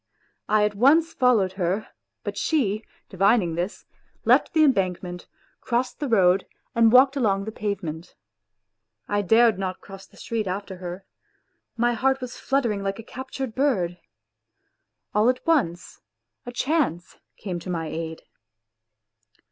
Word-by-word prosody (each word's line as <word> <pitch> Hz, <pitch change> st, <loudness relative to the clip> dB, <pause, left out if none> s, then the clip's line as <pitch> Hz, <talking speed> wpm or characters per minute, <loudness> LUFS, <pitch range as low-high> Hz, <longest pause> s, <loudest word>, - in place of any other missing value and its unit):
I 210 Hz, 0 st, +4 dB
at 210 Hz, -, -1 dB
once 290 Hz, +10 st, +4 dB
followed 235 Hz, -8 st, +3 dB
her; 185 Hz, +5 st, -1 dB, 0.3 s
but -, -, -4 dB
she, 220 Hz, -9 st, 0 dB, 0.2 s
divining 195 Hz, -2 st, +2 dB
this, 175 Hz, +4 st, -4 dB, 0.4 s
left -, -, +4 dB
the 315 Hz, -2 st, +5 dB
embankment, 185 Hz, -, 0 dB, 0.3 s
crossed 245 Hz, +1 st, -2 dB
the 290 Hz, -, -2 dB
road 190 Hz, -4 st, +3 dB, 0.3 s
and 230 Hz, -1 st, +5 dB
walked 265 Hz, +3 st, +6 dB
along 200 Hz, -7 st, +1 dB
the 220 Hz, -, -4 dB
pavement. 185 Hz, -7 st, -5 dB, 0.9 s
I 205 Hz, 0 st, 0 dB
dared 225 Hz, +1 st, +4 dB
not 185 Hz, -1 st, -3 dB
cross 195 Hz, -1 st, -12 dB
the -, -, -22 dB
street 225 Hz, -3 st, -3 dB
after 190 Hz, 0 st, -4 dB
her. 180 Hz, +1 st, -7 dB, 0.7 s
My 240 Hz, +1 st, +2 dB
heart 265 Hz, +3 st, +1 dB
was 250 Hz, -1 st, -7 dB
fluttering 240 Hz, -7 st, 0 dB
like 195 Hz, 0 st, -2 dB
a 225 Hz, -, -8 dB
captured 260 Hz, 0 st, -6 dB
bird. 190 Hz, -11 st, 0 dB, 1.1 s
All 210 Hz, +3 st, +4 dB
at 255 Hz, 0 st, -1 dB
once 180 Hz, -, 0 dB, 0.5 s
a -, -, -4 dB
chance 250 Hz, -, -1 dB, 0.2 s
came 180 Hz, -4 st, -5 dB
to 185 Hz, -, -9 dB
my 165 Hz, -2 st, -2 dB
aid. 160 Hz, 0 st, -5 dB
210 Hz, 140 wpm, -24 LUFS, 185-250 Hz, 1.1 s, walked